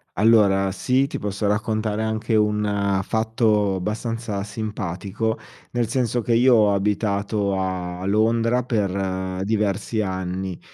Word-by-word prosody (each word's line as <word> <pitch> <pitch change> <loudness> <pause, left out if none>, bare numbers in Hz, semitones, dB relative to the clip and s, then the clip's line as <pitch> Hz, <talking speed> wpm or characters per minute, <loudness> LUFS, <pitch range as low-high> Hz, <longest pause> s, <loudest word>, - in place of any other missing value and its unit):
Allora 100 -2 +4
sì, 130 +7 +1
ti 140 - -5
posso 105 +1 -3
raccontare 110 +1 0
anche 110 +1 -1
un 105 -2 +1
fatto 110 -3 +1
bastanza 110 +1 -3
simpatico, 105 0 -3 0.4
nel 120 -2 0
senso 120 -1 0
che 115 - 0
io 125 +1 +5
ho 105 -2 +4
abitato 100 0 0
a 90 -1 -3
Londra 115 +4 +2
per 95 -4 -2
diversi 105 +1 0
anni, 95 -1 -3
105 Hz, 115 wpm, -23 LUFS, 95-110 Hz, 0.4 s, io